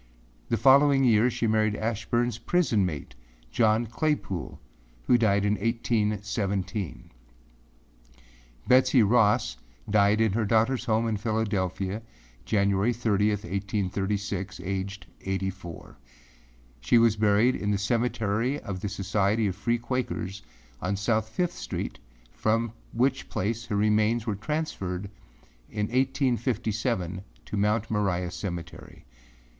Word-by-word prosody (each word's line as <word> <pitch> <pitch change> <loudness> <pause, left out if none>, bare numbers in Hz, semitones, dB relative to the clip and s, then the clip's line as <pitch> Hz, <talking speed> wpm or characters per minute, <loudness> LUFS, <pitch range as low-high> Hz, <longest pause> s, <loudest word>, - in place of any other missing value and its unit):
The 115 - +1
following 135 +3 +5
year, 115 -1 +4
she 120 - -2
married 110 -1 +2
Ashburneâs 115 +2 -1
prison 160 - +2
mate, 75 -5 -6 0.4
John 110 - +3
Claypoole, 120 - -2 0.4
who 125 - +4
died 100 -4 +3
in 105 0 +2
1817. 105 -4 -2 1.6
Betsey 130 -1 +5
Ross 105 - +3 0.3
died 105 0 +3
in 110 -2 +3
her 115 +1 +1
daughterâs 115 +4 +2
home 115 +1 +2
in 110 -2 0
Philadelphia 100 -2 -1 0.4
January 100 +2 +2
30, 105 -3 +1
1836, 100 0 -2
aged 95 0 -4 0.2
eighty 95 0 -2
four. 85 -8 -11 0.8
She - - +3
was 115 -2 +5
buried 110 +3 +3
in 105 - -2
the 105 - +2
Cemetery 115 +3 0
of 95 -2 -5
the 100 - -3
Society 100 +2 0
of 95 -3 -1
Free 115 +4 0
Quakers 120 -5 -3 0.4
on 95 +2 -1
South 110 +2 0
Fifth 175 +8 -1
Street, - - -5 0.3
from 115 +1 0 0.2
which 130 +3 0
place 115 +4 -2
her 105 - -2
remains 105 +2 +2
were 110 - -1
transferred 100 - -3 0.6
in 105 -1 -2
1857 115 - 0 0.2
to - - -5
Mount 105 +2 +1
Moriah 90 -4 0
Cemetery. 85 -2 -7
105 Hz, 120 wpm, -27 LUFS, 100-115 Hz, 1.6 s, following